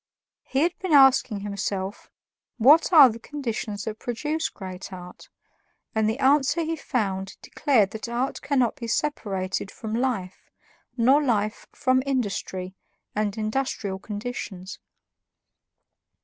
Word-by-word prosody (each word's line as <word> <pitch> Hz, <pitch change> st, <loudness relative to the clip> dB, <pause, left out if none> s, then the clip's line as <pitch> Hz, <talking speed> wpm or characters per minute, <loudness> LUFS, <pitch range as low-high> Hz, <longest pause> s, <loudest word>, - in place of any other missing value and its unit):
He 270 Hz, -, -1 dB
had 340 Hz, +2 st, +2 dB
been 370 Hz, -4 st, -2 dB
asking 265 Hz, -6 st, +5 dB
himself 200 Hz, 0 st, -4 dB, 0.5 s
what 290 Hz, +10 st, +6 dB
are 300 Hz, -6 st, +10 dB
the 230 Hz, -1 st, -4 dB
conditions 230 Hz, -6 st, -4 dB
that 220 Hz, 0 st, -5 dB
produce 300 Hz, +7 st, -2 dB
great 185 Hz, 0 st, -8 dB
art, 180 Hz, -1 st, -11 dB, 0.6 s
and 220 Hz, -1 st, +2 dB
the 220 Hz, -, -2 dB
answer 285 Hz, +3 st, +3 dB
he 325 Hz, +1 st, -2 dB
found 195 Hz, -9 st, -3 dB
declared 230 Hz, -10 st, +2 dB
that 220 Hz, 0 st, -6 dB
art 245 Hz, +3 st, -2 dB
cannot 255 Hz, -5 st, +1 dB
be 235 Hz, -, -6 dB
separated 200 Hz, -, -2 dB
from 220 Hz, +1 st, -7 dB
life, 225 Hz, -7 st, -2 dB, 0.5 s
nor 260 Hz, +5 st, +5 dB
life 215 Hz, -6 st, -1 dB
from 260 Hz, 0 st, +2 dB
industry 195 Hz, -7 st, -2 dB, 0.4 s
and 210 Hz, 0 st, -1 dB
industrial 215 Hz, -3 st, -2 dB
conditions. 205 Hz, -3 st, -6 dB
225 Hz, 120 wpm, -25 LUFS, 200-270 Hz, 0.6 s, are